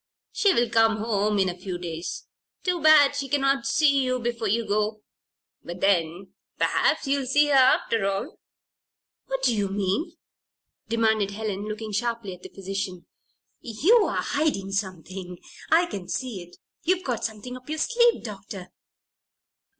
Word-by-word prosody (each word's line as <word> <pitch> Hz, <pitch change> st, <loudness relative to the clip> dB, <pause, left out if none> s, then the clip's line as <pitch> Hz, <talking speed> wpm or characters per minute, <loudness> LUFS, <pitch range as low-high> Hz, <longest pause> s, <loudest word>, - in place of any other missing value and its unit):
She 405 Hz, -, +3 dB
will 240 Hz, -8 st, +2 dB
come 225 Hz, -1 st, +3 dB
home 210 Hz, -1 st, 0 dB
in 190 Hz, -1 st, +3 dB
a 175 Hz, -, -3 dB
few 180 Hz, -1 st, -5 dB
days. 170 Hz, -1 st, -6 dB, 0.4 s
Too 360 Hz, -2 st, 0 dB
bad 295 Hz, -2 st, +6 dB
she 275 Hz, -1 st, -3 dB
cannot 275 Hz, -1 st, +1 dB
see 280 Hz, -1 st, +3 dB
you 255 Hz, 0 st, 0 dB
before 235 Hz, -2 st, -2 dB
you 225 Hz, +3 st, +1 dB
go. 210 Hz, +1 st, -1 dB, 0.6 s
But 175 Hz, +1 st, -7 dB
then 180 Hz, -1 st, 0 dB, 0.2 s
perhaps -, -, +1 dB
you'll 275 Hz, -1 st, 0 dB
see 295 Hz, +3 st, +3 dB
her, -, -, +2 dB
after 255 Hz, -5 st, +4 dB
all." 200 Hz, -, -4 dB, 0.9 s
"What -, -, -3 dB
do 240 Hz, -, +3 dB
you 205 Hz, -2 st, 0 dB
mean?" 200 Hz, -, -1 dB, 0.7 s
demanded 220 Hz, -3 st, +1 dB
Helen, 205 Hz, -1 st, -4 dB
looking 215 Hz, 0 st, -5 dB
sharply 230 Hz, -2 st, -2 dB
at 180 Hz, -, -13 dB
the -, -, -10 dB
physician. 195 Hz, -2 st, -5 dB, 0.5 s
"You're 355 Hz, -, +3 dB
hiding 285 Hz, -10 st, -1 dB
something. 185 Hz, -2 st, -4 dB, 0.3 s
I 335 Hz, +2 st, +5 dB
can 200 Hz, -, -7 dB
see 245 Hz, -8 st, -4 dB
it! 175 Hz, 0 st, -14 dB, 0.2 s
You've 365 Hz, +2 st, +1 dB
got 245 Hz, -4 st, -3 dB
something 225 Hz, +3 st, -5 dB
up 255 Hz, +2 st, -12 dB
your 310 Hz, -, -2 dB
sleeve, 475 Hz, +6 st, +2 dB
Doctor!" 200 Hz, -4 st, -8 dB
220 Hz, 150 wpm, -25 LUFS, 195-275 Hz, 0.9 s, bad